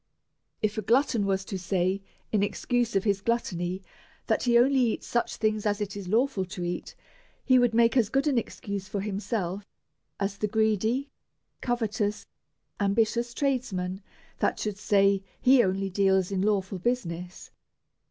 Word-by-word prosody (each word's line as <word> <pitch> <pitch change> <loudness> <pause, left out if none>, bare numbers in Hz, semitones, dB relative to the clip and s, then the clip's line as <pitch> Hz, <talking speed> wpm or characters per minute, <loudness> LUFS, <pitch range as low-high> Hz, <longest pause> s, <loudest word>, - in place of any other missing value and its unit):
If 215 0 0
a - - -1
glutton 230 -1 +2
was 190 0 0
to 190 -1 -4
say 185 +1 0 0.3
in 210 - +2
excuse 235 +2 0
of 195 - +2
his 200 -2 +1
gluttony, 185 -5 -1 0.4
that 220 - +1
he 240 -1 +5
only 265 +3 +4
eats 240 -3 +1
such 240 - -1
things 215 -1 0
as 205 0 0
it 205 -1 -3
is 200 -3 -6
lawful 225 0 +1
to 185 0 -6
eat, 175 0 -4 0.5
he 255 -1 +5
would 245 -2 +2
make 230 +1 +4
as 230 -5 +3
good 270 +4 +1
an 275 -5 +3
excuse 200 -4 -6
for 200 -1 -3
himself, 200 -1 -3 0.6
as 200 0 -2
the 210 - 0
greedy, 220 +5 +1 0.5
covetous, 220 -3 -1 0.5
ambitious 225 +4 +1
tradesman, 210 -9 -1 0.4
that - - +1
should 210 -2 -3
say 200 -1 +3 0.2
he 260 0 +6
only 195 +1 -1
deals 190 -1 +2
in 190 -1 0
lawful 195 -2 0
business. 180 -6 -3
205 Hz, 155 wpm, -27 LUFS, 195-235 Hz, 0.6 s, he